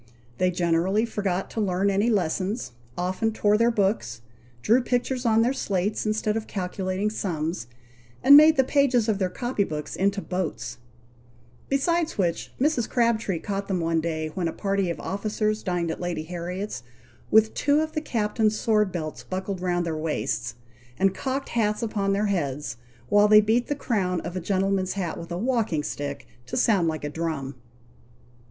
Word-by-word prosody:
They 185 - +3
generally 180 +4 +1
forgot 195 -4 -2
to 225 - -2
learn 195 0 +1
any 200 +4 +2
lessons 190 - -1 0.3
often 185 +5 0
tore 210 -1 +2
their 230 +2 +4
books 195 - 0 0.4
drew 235 +4 +4
pictures 250 0 -1
on 225 0 +4
their 250 +3 +2
slates, 205 -3 -1
instead 215 0 0
of 225 -1 -3
calculating 190 +1 -2
sums 165 - -3 0.6
and 280 +2 +9
made 310 +2 +8
the 265 - +5
pages 260 -4 +2
of 210 -3 +1
their 185 -2 +1
copy 240 +1 -1
books 150 -5 -5
into 200 +1 +1
boats; 180 -8 -4 0.9
besides 330 +4 +1
which, 175 -4 -1
Mrs. 265 -4 +1
Crabtree 230 -6 +1
caught 195 +3 -4
them 190 -2 0
one 165 -1 +1
day, 160 -1 -2
when 175 +1 -2
a 165 - -3
party 195 -2 0
of 170 - -3
officers 215 +1 -1
dined 175 -3 -1
at - - -6
Lady 175 -3 -2
Harriet's, 180 - -5 0.5
with 220 0 +5
two 290 +1 +2
of 315 0 -1
the 310 - -2
captain's 215 -4 0
sword 210 -3 +2
belts 155 -3 -4
buckled 190 0 -4
round 175 -1 0
their 165 -1 -2
waists, 120 -6 -2 0.4
and 195 0 +3
cocked 270 +5 -3
hats 215 -2 0
upon 205 -3 0
their 200 +2 +1
heads, 150 - -2 0.3
while 205 0 +5
they 210 0 +8
beat 225 +3 +2
the 290 - -1
crown 190 -10 -1
of 175 - -6
a - - -1
gentleman's 190 +1 0
hat 180 -4 -3
with 170 +1 -9
a 170 - -2
walking 220 - 0
stick, 145 -1 -5 0.2
to - - -3
sound 205 -9 +3
like 155 -2 -2
a 145 - -2
drum. 155 -4 -3
195 Hz, 175 wpm, -25 LUFS, 175-220 Hz, 0.9 s, and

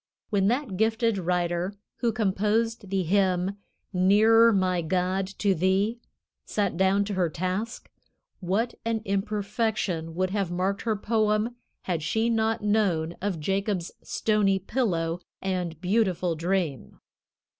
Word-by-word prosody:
When 195 -2 +2
that 240 -4 -1
gifted 225 0 +1
writer 175 +1 -1 0.2
who 235 -2 +1
composed 215 0 0
the 195 -1 0
hymn 190 +1 +1 0.4
"Nearer 215 +5 +5
my 185 -3 +1
God 185 +3 0
to 200 -2 +2
Thee" 190 +6 +1 0.4
sat 200 -4 -1
down 190 +3 +3
to 205 - -3
her 180 -3 +1
task, 185 +8 -3 0.5
what 205 +6 0
an 225 -1 -1
imperfection 200 -4 -1
would 185 +1 0
have 200 -3 -1
marked 185 +3 -1
her 225 -2 0
poem 215 +2 +1 0.3
had 170 -4 -2
she 220 +8 +1
not 225 0 0
known 185 -6 +1
of 190 -4 -2
Jacob's 195 +1 -1
stony 210 -3 +1
pillow 180 -6 -1 0.2
and 180 -4 -3
beautiful 185 -2 +1
dream! 165 -3 -2
195 Hz, 125 wpm, -26 LUFS, 180-220 Hz, 0.5 s, Nearer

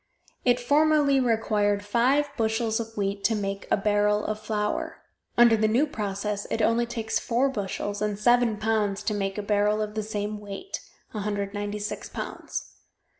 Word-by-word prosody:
It 245 0 +4
formerly 290 +1 +4
required 210 -4 +1
five 260 +7 +2
bushels 225 -1 0
of 225 -1 -6
wheat 200 0 -1
to 225 - +3
make 195 -1 -3
a - - +3
barrel 210 +1 +2
of 215 0 -2
flour; 210 -1 -2 0.3
under 235 -1 +7
the 215 0 +2
new 240 +7 +3
process 205 -5 -3
it - - -1
only 230 +2 +2
takes 225 -2 -2
four 255 +3 +1
bushels 205 -2 -3
and 210 -1 -1
seven 240 0 +3
pounds 210 -2 0
to 210 - 0
make 195 -1 -2
a 210 - -2
barrel 210 +1 +2
of 210 0 -2
the 215 - -1
same 210 0 -3
weight 205 - -6 0.3
196 205 0 -3
pounds. - - -6
215 Hz, 160 wpm, -26 LUFS, 205-230 Hz, 0.3 s, under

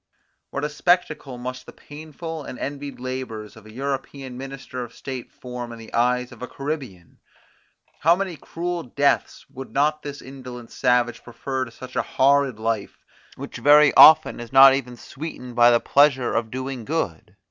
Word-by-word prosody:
What 140 - -4
a 150 - 0
spectacle 155 -4 0
must 130 +1 -7
the - - -9
painful 155 +1 -8
and 125 - -8
envied 140 -1 -6
labours 125 -4 -6
of 110 -1 -15
an 110 - -13
European 135 -1 -4
minister 130 -1 -7
of 120 - -11
state 130 -3 -7
form 125 -1 -7
in 115 - -9
the 115 -1 -13
eyes 125 +1 +1
of - - -14
a 125 - -5
Caribbean! 135 - -6 0.8
How 165 +3 +5
many 190 -2 -3
cruel 175 +3 -4
deaths 140 0 0
would 135 0 -9
not 150 +2 +1
this 145 -1 -7
indolent 125 -3 -10
savage 125 -2 +1
prefer 130 +2 -4
to 115 - -12
such 130 +2 -11
a - - +2
horrid 140 -2 +2
life, 110 -2 -3 0.3
which - - -8
very 150 0 +6
often 155 - +8
is 120 +1 -8
not 135 0 +9
even 125 -3 -3
sweetened 130 -3 -8
by 120 0 +7
the 120 -1 +4
pleasure 140 -3 +3
of 115 -1 -1
doing 130 0 -5
good? 110 - -3
130 Hz, 170 wpm, -23 LUFS, 120-145 Hz, 0.8 s, not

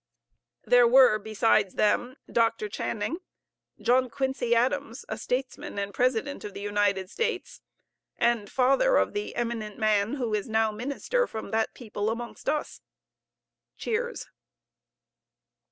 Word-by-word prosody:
There 245 -1 +6
were 250 -3 +6
besides 215 -2 +1
them, 245 +4 +1
Dr. 230 -2 +1
Channing, 210 +7 -3 0.6
John 255 +1 +3
Quincy 265 -2 0
Adams, 260 +1 0
a - - -3
statesman 250 +1 -4
and 200 0 -3
President 255 +4 0
of 205 -2 -7
the - - -5
United 205 -2 0
States, 460 -5 -3 0.6
and 235 -4 +1
father 275 - +3
of - - +1
the 415 0 -4
eminent 230 -3 -3
man 215 +1 +2
who 240 -6 -2
is 210 +1 -1
now 220 0 +2
Minister 280 - -1
from 220 -2 -7
that 220 0 0
people 215 -3 -3
amongst 235 +4 -4
us. 300 0 -2 1.0
(Cheers.) 480 +2 -2
235 Hz, 125 wpm, -27 LUFS, 215-265 Hz, 1.0 s, There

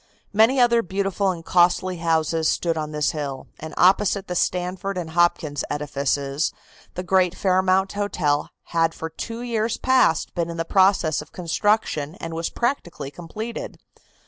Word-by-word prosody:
Many 225 +6 +4
other 235 -1 +5
beautiful 195 0 -1
and 170 -3 -4
costly 180 +1 +3
houses 160 -1 +1
stood 170 -1 0
on 155 -1 -3
this 150 -1 0
hill, 140 -3 -5
and 160 0 -7
opposite 195 +1 +3
the 180 - -3
Stanford 185 +2 -1
and 165 -3 -4
Hopkins 160 -4 +1
edifices 140 0 -1 0.4
the 180 - -4
great 185 -1 +2
Fairmount 190 0 +2
Hotel 170 -8 0 0.2
had 165 -1 +2
for 160 0 -6
two 230 +8 -6
years 230 -1 -1
past 260 -11 +2
been 170 -1 -2
in 170 - -6
process 190 -6 +3
of 150 - -13
construction 175 -3 0
and 165 -3 -7
was 165 +1 -2
practically 235 - -3
completed. 215 +9 -7
175 Hz, 145 wpm, -23 LUFS, 160-195 Hz, 0.4 s, other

